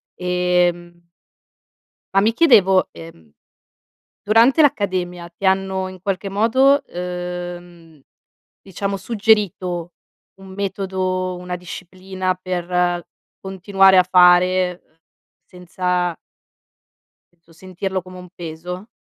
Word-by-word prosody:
Ehm 180 -1 -1 1.1
ma 195 - +4
mi 220 +3 +2
chiedevo, 210 - +4
ehm, 80 - -14 0.9
durante 230 +8 +4
l'accademia 185 -9 -1
ti 170 +3 -13
hanno 190 0 0
in 185 -1 -12
qualche 195 +1 -3
modo, 260 +7 +3
ehm, 175 -2 -7 0.6
diciamo 195 +1 -4
suggerito 195 -4 0 0.4
un 190 0 -13
metodo, 190 -2 -3
una 180 0 -6
disciplina 185 +1 -5
per 180 -1 -2 0.4
continuare 195 0 +3
a 185 - +6
fare, 180 0 +4
uhm, 155 - -36 0.5
senza 180 -1 -2 1.2
penso 170 -1 -25
sentirlo 185 +2 -5
come 185 0 -13
un 180 0 -12
peso? 175 +3 -8
185 Hz, 95 wpm, -20 LUFS, 175-195 Hz, 1.2 s, a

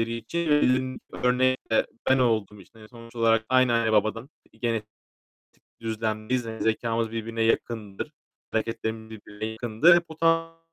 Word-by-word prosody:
için 160 +9 -3
verilen 130 -3 +2 0.2
örnek 130 0 +1
de 110 - +3 0.2
ben 130 0 +5
olduğum 110 -4 0
için, 105 +5 -19
hani, 110 0 -14
sonuç 115 -1 -14
olarak 115 -1 +3
aynı 130 -2 +4
anne 115 -1 +2
babadan 110 +4 +1 0.3
genetik 115 -3 -1 0.9
düzlemdeyiz. 110 +2 -2
Hani, 110 0 -5
zekâmız 115 0 0
birbirine 115 0 -3
yakındır, 115 +2 -1 0.4
hareketlerimiz 110 0 -3
birbirine 105 -1 -7
yakındır. 120 +10 +4
Bu 160 - -10
tamamen 165 0 +1
115 Hz, 135 wpm, -26 LUFS, 110-130 Hz, 0.9 s, ben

